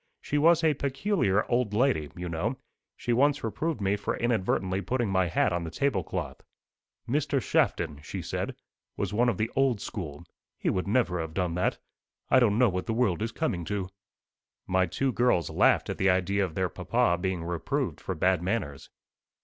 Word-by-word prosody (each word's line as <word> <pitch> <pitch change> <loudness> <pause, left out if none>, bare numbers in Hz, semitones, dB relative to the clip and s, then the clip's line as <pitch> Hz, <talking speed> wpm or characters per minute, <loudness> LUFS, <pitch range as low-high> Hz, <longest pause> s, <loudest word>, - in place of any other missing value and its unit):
She 145 - -1
was 165 +2 +5
a 160 -1 +4
peculiar 140 - 0
old 120 -4 0
lady, 115 - +2
you 90 0 -5
know. 90 +10 -2 0.4
She 120 - -1
once 145 +4 +3
reproved 125 +7 -2
me 100 0 +1
for 100 - -3
inadvertently 95 -5 0
putting 120 0 -1
my 95 -1 +2
hat 85 - +1
on 85 0 -1
the 80 - -4
tablecloth. 105 - -2 0.7
'Mr. 140 +2 +1
Shafton,' 80 - 0
she - - -6
said, - - -3 0.4
'was - - -2
one 120 +3 +3
of 110 - -1
the 110 +3 -1
old 135 -5 +2
school; 85 -8 -6 0.3
he - - 0
would 90 +1 -2
never 100 -6 +1
have 80 0 -6
done 90 -3 0
that. 90 +2 0 0.5
I 130 - +7
don't 110 -4 +3
know 125 0 +5
what 90 -1 -3
the 110 - -1
world 105 -6 +1
is 115 +1 -1
coming 100 - -2
to.'" 95 -1 -3 0.8
My 95 0 +2
two 135 +9 0
girls 120 - +2
laughed - - +3
at - - -4
the 95 - +3
idea 95 +2 +2
of 85 -4 -4
their 95 -1 +1
papa 85 +1 +1
being 95 -3 -1
reproved 85 -1 -2
for - - -3
bad 90 +1 +2
manners. 90 -7 -3
100 Hz, 185 wpm, -28 LUFS, 90-125 Hz, 0.8 s, I